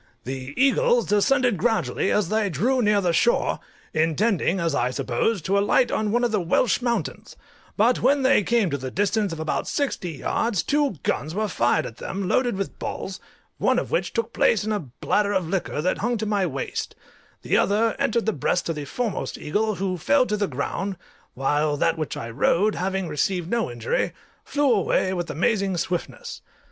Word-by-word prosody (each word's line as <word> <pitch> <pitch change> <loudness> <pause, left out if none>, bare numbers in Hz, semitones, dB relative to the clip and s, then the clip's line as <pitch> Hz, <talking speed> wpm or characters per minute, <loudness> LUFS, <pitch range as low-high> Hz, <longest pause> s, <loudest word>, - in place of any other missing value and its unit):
The 130 +1 -6
eagles 480 - +3
descended 240 - +2
gradually 190 - 0
as 210 -5 +1
they 215 -1 +1
drew 240 - +1
near 210 -2 +3
the 175 -3 +1
shore, 480 - +2 0.3
intending, 170 +3 +1
as 165 -3 0
I 125 -2 +1
supposed, 150 - -1
to 200 +1 +2
alight 210 +4 +3
on 215 -1 0
one 240 +2 +1
of 240 - +1
the 210 -3 +1
Welsh 185 +8 +2
mountains; 235 -1 -3 0.4
but 235 +4 +3
when 275 +2 +3
they 260 -4 +5
came 220 -3 +1
to 140 - -2
the 130 0 -4
distance 205 - 0
of 165 - -6
about 160 -1 -2
sixty 225 - -2
yards 195 - -1
two 290 -6 +1
guns 155 +4 -2
were 215 +1 0
fired 120 - +1
at 115 - -8
them, 190 0 -4
loaded 245 0 +1
with 195 - -4
balls, 190 -1 -5 0.4
one - - +2
of - - -2
which - - 0
took 460 - -2
place 215 -3 +3
in 215 - -2
a 210 - 0
bladder 200 - -1
of 185 -4 0
liquor 170 -4 -2
that 185 - 0
hung 240 +2 0
to 220 - -3
my 205 -3 +1
waist; 135 -4 -4 0.5
the - - +1
other 220 +3 +2
entered 260 -4 +1
the 220 - +1
breast 180 - 0
of 165 - -1
the 150 -1 -5
foremost 230 - -3
eagle, 210 +7 -1
who 185 -1 -2
fell 275 - +3
to 210 - -1
the 205 -1 0
ground, 185 +7 -3 0.4
while 145 +3 +1
that 165 - +2
which 155 -6 -4
I 115 0 -5
rode, 185 - +2
having 190 0 -2
received 170 +3 -1
no 235 -1 0
injury, 120 -1 -1 0.3
flew 285 -3 +2
away 190 -2 +1
with 175 -2 -3
amazing 195 +3 0
swiftness. 180 - -4
200 Hz, 190 wpm, -24 LUFS, 165-230 Hz, 0.5 s, they